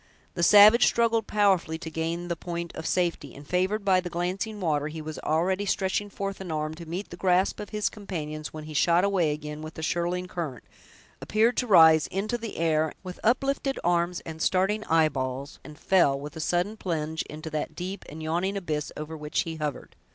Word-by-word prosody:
The 170 - -3
savage 210 +6 +8
struggled 230 -2 +2
powerfully 195 -6 +2
to 160 -1 -7
gain 165 +2 -3
the 170 - -1
point 170 0 -5
of 160 - -5
safety, 170 -7 -1
and, 140 +1 -12
favored 190 +4 0
by 190 -2 +4
the 180 -1 -4
glancing 185 +5 -3
water, 150 -5 0
he 155 +1 -6
was 155 0 -6
already 185 +6 0
stretching 195 +2 0
forth 195 -1 -5
an 180 -3 -6
arm 155 0 -2
to 165 +1 -10
meet 180 +5 -5
the 175 - -8
grasp 185 +1 +2
of 210 - -6
his 210 -1 -1
companions, 155 -7 -5
when 155 -1 -8
he 155 0 -8
shot 170 +4 +3
away 190 -6 +2
again 150 0 -6
with 155 0 -8
the 160 - -6
shirling 175 +2 -1
current, 160 -9 -5 0.6
appeared 225 +3 +2
to 250 - 0
rise 160 -6 +7
into 215 +5 -2
the 225 -2 -6
air, 160 -1 +1
with 180 -1 -8
uplifted 270 +3 +1
arms 175 0 +1
and 160 -1 -8
starting 195 +5 +1
eyeballs, 140 -4 0
and 150 -1 -11
fell, 145 -8 +3
with 145 +1 -8
a - - -6
sudden 175 +6 0
plunge, 160 -4 -2
into 155 +1 -7
that 155 0 -3
deep 185 +3 -5
and 155 +2 -8
yawning 175 +5 -1
abyss 155 -6 -3
over 155 +1 -6
which 150 -1 -1
he 165 -1 -5
hovered. 150 -2 -5
170 Hz, 200 wpm, -27 LUFS, 155-195 Hz, 0.6 s, savage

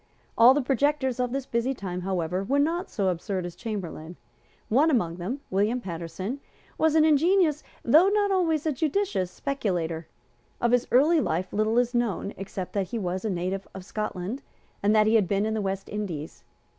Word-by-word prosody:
All 245 +3 +7
the 290 - +1
projectors 270 -1 +1
of 250 -1 0
this 270 0 -2
busy 240 +3 -1
time, 180 -4 -5
however, 180 0 -1
were 270 +8 0
not 335 +6 0
so 195 -4 0
absurd 185 +1 -2
as 175 - -7
Chamberlayne. 180 -7 -6 0.5
One 280 +8 +4
among 175 - +1
them, 225 +11 -4
William 210 +6 +1
Paterson, 185 - -5 0.4
was 320 -1 +2
an 315 -1 +6
ingenious, 315 0 +3 0.2
though 310 +10 +6
not 410 -1 +2
always 325 -5 +1
a 315 - +2
judicious, 305 - 0
speculator. 175 - -2 0.5
Of 235 - +1
his 245 -1 +2
early 305 +6 +5
life 180 - -2
little 215 +2 +1
is 245 0 +2
known 235 -4 -1
except 190 -1 -6
that 195 -2 -1
he 235 - -4
was 185 -2 -3
a 220 - -1
native 185 +1 -3
of 190 -1 -8
Scotland, 210 +3 -4 0.4
and 205 +2 +3
that 215 0 +5
he 215 - +3
had 215 -5 +4
been 200 +2 +1
in 220 - -1
the 220 - -1
West 195 0 -3
Indies. 180 -8 -5
220 Hz, 185 wpm, -26 LUFS, 185-275 Hz, 0.5 s, All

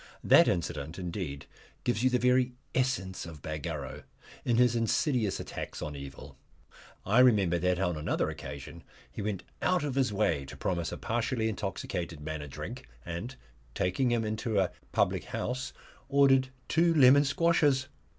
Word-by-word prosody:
That - - +7
incident, 80 -2 -2
indeed, 85 -6 -4 0.4
gives 120 -3 0
you 130 - +4
the 125 - +2
very 125 0 +3 0.2
essence 125 -10 -1
of 80 -4 -11
Bagarrow 75 -2 -5 0.4
in 120 -2 +1
his 120 -1 +4
insidious 115 -1 +1
attacks - - -6
on 75 -1 -5
evil. 70 -1 -10 0.7
I 105 +6 +4
remember 100 -9 +5
that 90 +1 +1
on 90 -4 0
another 75 - 0
occasion 70 +4 -8 0.3
he - - -6
went 100 -2 -3 0.2
out 180 -3 +2
of 145 -3 -2
his 130 -3 +1
way 95 -9 +1
to 65 - -10
promise 85 -3 -1
a - - -5
partially 115 0 -1
intoxicated 90 -5 -4
man 80 0 -5
a 75 - -7
drink; 65 - -7 0.2
and 85 +10 -5 0.4
taking 95 +8 +1
him 120 -2 +1
into 110 0 -2
a 95 -2 +1 0.2
public - - +1
house 125 +1 -3 0.4
ordered 135 -2 +5 0.2
two 165 0 +3
lemon 140 0 +7
squashes! 145 -3 +2
110 Hz, 155 wpm, -30 LUFS, 85-130 Hz, 0.7 s, That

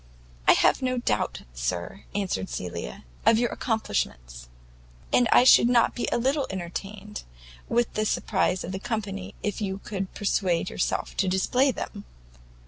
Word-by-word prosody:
"I - - +9
have - - +3
no 255 -1 0
doubt, 105 - -1
sir," 85 - -4
answered 185 - -1
Cecilia, 85 -8 -5 0.2
"of 225 - +5
your 240 0 +1
accomplishments; - - -2 0.6
and 245 -3 +4
I - - +7
should 250 - +7
be 245 - +2
not 240 +1 +3
a - - +2
little 270 +4 +1
entertained 195 +3 -6 0.5
with 240 0 +1
the 215 - 0
surprize 185 - 0
of 175 - -5
the 190 - -4
company 200 -3 -4
if 210 0 -2
you 195 -2 -2
could 195 -2 -4
persuade 185 -3 0
yourself - - -1
to 195 - +2
display 245 +9 +2
them." 255 - -5
195 Hz, 150 wpm, -26 LUFS, 170-230 Hz, 0.6 s, I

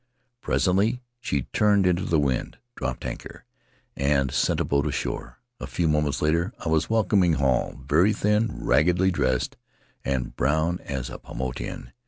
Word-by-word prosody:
Presently 105 +7 +1 0.2
she 70 - -1
turned 105 -2 +4
into 90 0 +2
the 80 - +2
wind, 70 -4 -1 0.2
dropped 60 -1 -4
anchor, - - -7 0.5
and 70 -1 +1
sent - - +1
a - - +1
boat 70 +1 +1
ashore 70 - -4
— 120 - -54
a - - -5
few 85 - 0
moments 75 -1 +1
later 85 +7 +1
I 85 - -4
was 80 0 +1
welcoming 100 -5 +3
Hall 70 -3 0
— - - -17
very 85 +9 +4
thin, 105 +2 +1 0.2
raggedly 90 +6 +3
dressed, 65 -7 0 0.5
and 65 -2 -2
brown 80 +8 +1
as 65 -3 -5
a - - -7
Paumotuan. 65 0 -5
80 Hz, 160 wpm, -25 LUFS, 70-95 Hz, 0.5 s, turned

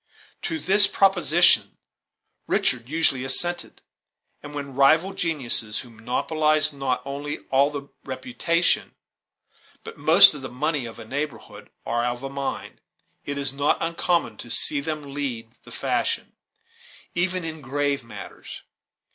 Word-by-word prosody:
To 325 - -3
this 205 -6 +7
proposition 175 -3 +3 0.7
Richard 125 -1 0
usually 145 -4 +1
assented; 175 +6 -2 0.6
and 145 0 -10
when 140 -2 -6
rival 155 +8 +4
geniuses 125 -9 -1
who 125 - -14
monopolize 150 +7 0
not 135 -2 -2
only 140 +1 -5
all 135 +2 +4
the 140 -1 -7 0.2
reputation 170 - -1 0.9
but - - -10
most - - +8
of 145 - -8
the 130 - -6
money 145 0 -2
of 115 - -10
a 115 - -10
neighborhood, 110 -6 -6 0.2
are 120 0 -1
of 120 +1 -3
a 135 - -5
mind, 140 0 -5 0.4
it 145 0 -4
is 140 -1 +1
not 140 +1 +1
uncommon 170 +1 -1
to 120 - -9
see 145 +4 +2
them 145 -1 -5
lead 120 -6 -4
the - - -13
fashion, - - -2 0.8
even 185 +1 0
in 160 -1 -6
graver 140 -1 -2
matters. 115 - -10
140 Hz, 135 wpm, -24 LUFS, 130-160 Hz, 0.9 s, most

